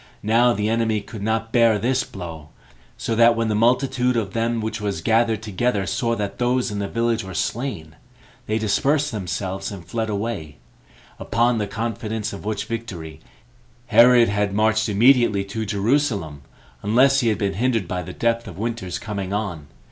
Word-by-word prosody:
Now 115 +3 +4
the 105 -3 -1
enemy 110 -1 +1
could 100 +1 -9
not 110 +1 -1
bear 115 -3 +5
this 125 +5 +1
blow, 80 -5 -9 0.5
so 115 - -2
that 115 +1 +5
when 115 -1 0
the - - +1
multitude 125 +2 +2
of 100 -4 -2
them 115 0 0
which 110 0 -4
was 100 -4 -2
gathered 110 +3 +1
together 105 0 -1
saw 115 +4 -1
that 105 -3 -4
those 125 -1 +1
in 105 - -3
the 100 - -2
village 115 0 0
were 95 -2 -8
slain, 95 - -3 0.5
they 110 - 0
dispersed 140 +7 +1
themselves, 95 -1 -4
and 95 -4 -9
fled 110 +4 -3
away; 100 -8 -4 0.6
upon 120 0 +1
the 105 - -1
confidence 110 -1 -3
of 100 - -9
which 110 0 -2
victory, 95 -9 -6 0.7
Herod 120 0 +6
had 100 -1 0
marched 110 +1 +2
immediately 115 -1 +4
to 110 +2 -4
Jerusalem, 100 - 0 0.4
unless 130 +6 +4
he 120 - +1
tad 105 - 0
been 100 -2 -1
hindered 115 -2 0
by 90 +1 -3
the 80 - -7
depth 115 0 -1
of 95 -4 -9
winter's 110 -5 -3
[coming 100 -3 -5
on]. 90 -9 -3
110 Hz, 170 wpm, -22 LUFS, 100-115 Hz, 0.7 s, Herod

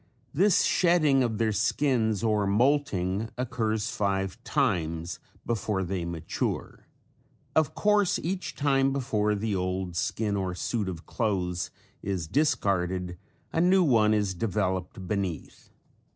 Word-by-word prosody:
This 195 +4 +4
shedding 155 -6 +3
of 115 -4 0
their 110 0 +1
skins 110 0 +1
or 105 -3 +2
molting 110 -4 +1
occurs 110 -3 -1
five 95 -2 -2
times 85 0 -1 0.3
before 105 -4 -1
they 90 -1 -3
mature. 85 -2 -4 0.7
Of 155 -3 +2
course 210 -2 +3
each 180 0 -4
time 135 -2 +2
before 105 -6 0
the 105 0 -1
old 90 -1 -2
skin 105 +3 -1
or 95 -2 -2
suit 105 +1 -2
of 85 -2 -7
clothes 95 -5 -1 0.3
is 95 -4 -2
discarded 90 - 0 0.3
a 165 - +2
new 185 +1 +5
one 115 -8 +4
is 105 -2 0
developed 95 -2 -2
beneath. 95 -6 -4
105 Hz, 125 wpm, -27 LUFS, 95-130 Hz, 0.7 s, new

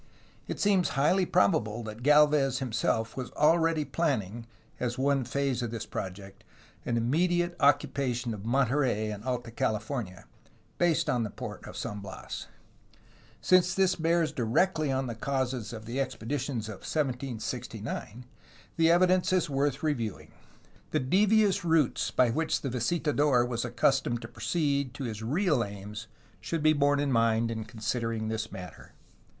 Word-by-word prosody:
It - - -5
seems 195 -3 +3
highly 175 +6 +3
probable 105 +3 +2
that 110 +1 -8
Galvez 145 -1 +4
himself 115 -3 -1
was 130 -2 -5
already 160 0 +3
planning, 120 - -2 0.3
as 120 -1 -2
one 135 0 +2
phase 135 0 -1
of 120 - -2
this 115 -1 -5
project, 95 +1 -7 0.4
an 120 - +1
immediate 175 +8 +1
occupation 135 -4 +1
of 100 -2 -8
Monterey 125 -3 +1
in 105 -1 -6
Alta 125 -1 -3
CaHfornia, 110 -4 -3 0.6
based 175 -2 +2
on 125 - +1
the 110 - -2
port - - -8
of - - -9
San 105 - -4
Bias. 100 -1 -7 0.9
Since 185 0 +4
this 190 -1 +3
bears 165 -1 +1
directly 150 +5 +1
on 130 0 0
the 120 - -4
causes 125 -1 -2
of 110 -2 -8
the 120 +4 -4
expeditions 130 -2 -3
of 110 -3 -7
1769, 125 -4 -4 0.5
the 165 0 +4
evidence 180 +2 +4
is 180 -5 +1
worth 140 +1 0
reviewing. 120 -10 -2 0.6
The - - +1
devious 200 +7 +3
routes 160 -5 +2
by 125 -2 +3
which 160 +6 0
the 135 - -3
visitador 145 -2 +2
was 120 -1 -2
accustomed 120 0 +1
to - - -6
proceed 140 -6 -1
to 140 - -5
his 110 -3 -4
real 150 - +1
aims 100 +1 -8 0.3
should 150 +9 -3
be 155 0 +5
borne 145 -1 +2
in 145 -1 0
mind 115 -1 +2
in 110 -1 -4
considering 115 0 -3
this 110 0 -3
matter. 90 -3 -10
130 Hz, 145 wpm, -29 LUFS, 115-150 Hz, 0.9 s, be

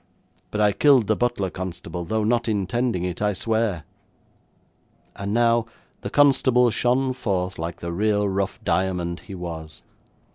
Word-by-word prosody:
But 105 - -2
I 105 -1 +5
killed 130 +3 +4
the 110 +2 +2
butler, 120 -6 -1
constable, 90 -1 -6
though 110 +3 -1
not 120 +2 +1
intending 105 0 0
it, 90 0 -4
I 105 -1 +2
swear.' 110 -4 -1 1.3
And 100 0 -4
now 115 0 +3 0.3
the - - -4
constable 130 -4 +4
shone 130 +3 +1
forth 95 -8 -2
like 85 +1 -5
the 85 0 -4
real 105 +2 +1
rough 100 0 -2
diamond 90 -2 -1
he 100 - -10
was. 80 -3 -7
105 Hz, 145 wpm, -23 LUFS, 90-120 Hz, 1.3 s, I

